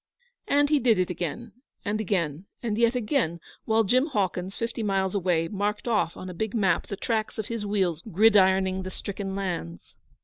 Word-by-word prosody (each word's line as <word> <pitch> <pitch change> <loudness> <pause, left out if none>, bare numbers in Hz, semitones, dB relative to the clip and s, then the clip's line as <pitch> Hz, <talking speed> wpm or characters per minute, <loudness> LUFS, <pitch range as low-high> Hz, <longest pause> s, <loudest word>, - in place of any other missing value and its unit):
And 285 0 +3
he 300 - +5
did 230 -3 +4
it 180 -1 +1
again 180 +7 -4 0.3
and 215 +1 0
again, 175 -4 -1 0.2
and 220 -3 -1
yet 235 +2 +3
again, 225 - 0 0.3
while 225 0 +3
Jim 255 +8 +3
Hawkins, 190 - -1
fifty 230 0 -3
miles 195 -3 0
away, 175 -4 +1
marked 210 +4 -2
off 210 -7 +1
on 185 - -7
a 180 - -6
big 220 +5 -3
map 200 -4 +2
the 200 - -5
tracks 220 +1 -2
of 220 - -4
his 225 -3 -3
wheels 185 -6 0
gridironing 190 -2 +4
the 185 - -5
stricken 195 0 -5
lands. 170 - -4
200 Hz, 180 wpm, -26 LUFS, 185-225 Hz, 0.3 s, he